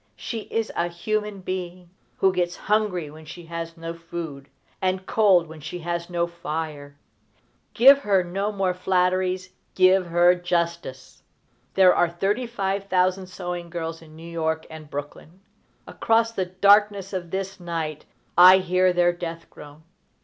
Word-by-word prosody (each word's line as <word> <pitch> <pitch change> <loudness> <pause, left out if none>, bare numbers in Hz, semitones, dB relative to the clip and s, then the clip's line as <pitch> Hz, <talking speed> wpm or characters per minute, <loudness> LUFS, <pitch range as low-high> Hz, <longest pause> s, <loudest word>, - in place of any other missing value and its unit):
She 225 -3 -6
is 225 -1 -2
a 170 - 0
human 210 +3 -3
being, 180 -1 -6 0.3
who 190 -1 +3
gets 175 -1 -1
hungry 205 -7 -1
when 155 +1 -13
she 170 +2 -11
has 165 0 -6
no 165 0 -6
food, 165 -4 -8 0.3
and 185 0 -1
cold 195 -6 +4
when 160 -1 -12
she 160 +4 -7
has 170 0 -4
no 170 -1 0
fire. 155 -4 -6 0.8
Give 275 +4 +8
her 200 -8 +2
no 195 +4 -2
more 195 -3 0
flatteries: 185 0 0 0.2
give 185 0 +4
her 175 +1 +5
justice! 170 -6 -3 0.5
There 185 -1 +6
are 175 - +2
thirty 200 +8 -1
five 195 -3 -2
thousand 185 0 +1
sewing 180 -2 -6
girls 165 -1 -5
in 155 -1 -15
New 165 +1 -11
York 160 -1 -2
and 155 -2 -10
Brooklyn. 145 +5 -8 0.5
Across 230 0 +1
the 190 -5 -2
darkness 200 +1 +3
of 175 -2 -4
this 195 +2 -4
night 165 -3 -4 0.3
I 185 +2 +9
hear 185 0 +2
their 175 0 +3
death 170 -1 -7
groan. 150 +1 -13
180 Hz, 150 wpm, -24 LUFS, 165-190 Hz, 0.8 s, I